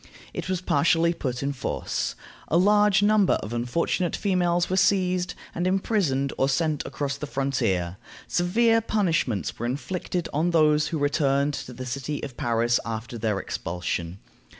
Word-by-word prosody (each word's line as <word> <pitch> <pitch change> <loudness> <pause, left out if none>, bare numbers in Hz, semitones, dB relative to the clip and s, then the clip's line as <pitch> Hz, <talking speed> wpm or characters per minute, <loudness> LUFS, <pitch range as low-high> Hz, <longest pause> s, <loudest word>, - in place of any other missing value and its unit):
It - - -5
was 185 -2 -1
partially 165 +2 +3
put 130 -5 -3
in 140 +1 -1
force. 130 - -3 0.3
A 165 - +2
large 205 +1 +4
number 210 -2 +4
of 110 - -5
unfortunate 145 +9 0
females 175 -3 +1
were 185 - -1
seized, 185 -2 +2 0.2
and 175 +2 -1
imprisoned 185 -8 +1
or 135 - +3
sent 150 +2 0
across 140 -1 -3
the 150 - -5
frontier. 105 -11 -1 0.3
Severe 225 +6 +3
punishments 165 - 0
were 120 - -1
inflicted 175 +6 -3
on 160 +4 +1
those 155 -2 +3
who 165 - -2
returned 145 -1 +1
to 135 -2 -6
the 130 +2 -7
city 140 +4 -4
of 135 -4 -6
Paris 120 0 +1
after 115 +2 -5
their 105 -2 0
expulsion. 85 -1 -4
150 Hz, 150 wpm, -25 LUFS, 125-180 Hz, 0.3 s, large